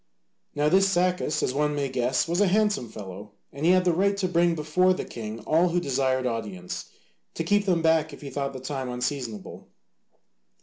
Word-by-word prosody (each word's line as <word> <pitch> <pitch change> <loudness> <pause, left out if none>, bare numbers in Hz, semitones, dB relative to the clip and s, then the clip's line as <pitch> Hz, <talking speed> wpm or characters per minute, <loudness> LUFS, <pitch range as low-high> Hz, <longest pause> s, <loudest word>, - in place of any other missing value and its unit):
Now 145 +1 +2
this 195 +4 +4
Sacas, 180 -3 +1
as 125 - 0
one 150 +1 0
may 140 -1 -1
guess, 130 +1 0
was 170 +4 0
a 205 - +4
handsome 205 - +1
fellow, 100 -1 -9 0.2
and 145 +4 -1
he - - +6
had 185 0 +4
the 175 - +3
right 200 +3 +1
to 195 -2 0
bring 175 -1 +2
before 180 +4 +2
the - - -4
king 110 0 -7
all 165 +9 +2
who 175 +1 +1
desired 130 -4 0
audience, 95 - -4 0.5
to - - -2
keep 205 +4 +1
them 170 -3 +2
back 160 -1 +3
if 140 - -11
he 140 -2 -7
thought 140 0 -3
the 130 - -6
time 130 -1 -4
unseasonable. 125 -4 -4
150 Hz, 200 wpm, -26 LUFS, 125-180 Hz, 0.5 s, he